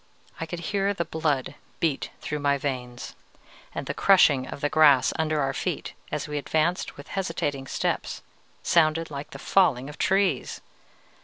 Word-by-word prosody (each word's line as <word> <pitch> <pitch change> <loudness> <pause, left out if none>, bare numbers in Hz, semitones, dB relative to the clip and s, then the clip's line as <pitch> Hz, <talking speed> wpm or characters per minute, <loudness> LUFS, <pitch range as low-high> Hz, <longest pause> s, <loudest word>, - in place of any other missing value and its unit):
I 165 - -3
could 170 +1 -5
hear 200 0 +1
the 170 - -1
blood 150 -5 -1 0.3
beat 160 -5 0
through 150 - -3
my 140 -1 +2
veins; 125 -3 -5 0.6
and - - -3
the - - -3
crushing 145 -9 +5
of - - -7
the 145 - +1
grass 145 -4 +5
under 155 -1 +1
our 135 -1 0
feet - - -3 0.2
as - - -2
we 150 -1 -2
advanced 160 +4 0
with 145 - -11
hesitating 145 -8 -2
steps - - -2 0.4
sounded 165 -1 +2
like 145 +1 -6
the - - -9
falling 145 -9 +2
of 150 - -11
trees. 195 +1 +1
150 Hz, 160 wpm, -26 LUFS, 140-165 Hz, 0.6 s, crushing